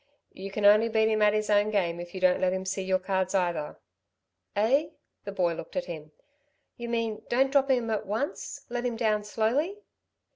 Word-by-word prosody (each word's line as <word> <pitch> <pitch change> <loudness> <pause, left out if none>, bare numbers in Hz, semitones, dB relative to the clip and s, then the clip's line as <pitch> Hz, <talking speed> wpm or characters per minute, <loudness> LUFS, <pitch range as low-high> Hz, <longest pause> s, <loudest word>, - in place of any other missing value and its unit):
"You 195 +1 -7
can 205 +1 -2
only 215 +3 +6
beat 220 0 +3
him 215 -1 +1
at 210 0 +4
his 215 0 0
own 205 +1 +4
game 175 -5 0
if 175 +1 -8
you - - -3
don't 185 0 +3
let 185 0 +2
him 190 0 -3
see 190 +1 -2
your 190 0 +1
cards 190 0 -1
either." 175 -5 -1 0.8
"Eh?" 260 +9 +3 0.4
the 200 - -4
boy 180 -3 +1
looked - - -9
at 275 - -1
him. 155 -3 -8 0.6
"You 235 0 -6
mean 225 -2 -2
don't 265 +2 +2
drop 275 -1 +3
him 245 -4 +1
at 215 -1 -2
once... 220 +8 -4
let 240 0 -3
him 245 -2 -1
down 215 -2 +1
slowly." 240 - 0
210 Hz, 205 wpm, -28 LUFS, 190-230 Hz, 0.8 s, only